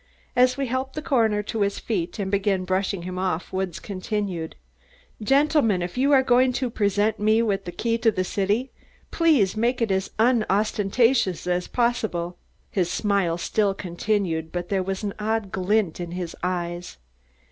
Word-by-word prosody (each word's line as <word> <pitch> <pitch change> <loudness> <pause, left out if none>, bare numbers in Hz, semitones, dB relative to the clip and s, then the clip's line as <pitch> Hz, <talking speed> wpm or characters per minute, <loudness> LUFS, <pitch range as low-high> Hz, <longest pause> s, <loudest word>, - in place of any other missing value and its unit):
As 255 +1 +4
we 275 - 0
helped 260 +2 -3
the 305 - -3
coroner 220 -7 +2
to 220 +1 -3
his 200 0 +1
feet 180 -5 -3
and 195 -2 -3
began 195 -2 +1
brushing 185 0 -1
him 185 +1 -5
off 185 -2 -2
Woods 190 -3 -2
continued: 190 -4 -4 0.7
"Gentlemen, 270 - +3
if 175 - -5
you 270 +3 +2
are 270 -2 +6
going 255 0 +4
to 250 -1 -2
present 210 0 +1
me 215 +2 +3
with 200 -3 -1
the 175 - -5
key 230 +4 -1
to 225 - +4
the 185 -4 -1
city, 205 +7 -1 0.4
please 295 - +3
make 240 +3 +1
it 230 -4 0
as 190 0 0
unostentatious 220 -1 +2
as 180 0 -1
possible." 220 -8 -1 0.3
His 180 -3 0
smile 190 -3 +1
still 200 +2 0
continued, 175 -3 -2
but 175 0 -4
there 195 -2 +1
was 190 +2 -3
an 200 -1 -2
odd 215 -2 -1
glint 190 -2 0
in 175 -1 -5
his 180 -2 -5
eyes. 175 - -3
200 Hz, 170 wpm, -24 LUFS, 185-230 Hz, 0.7 s, are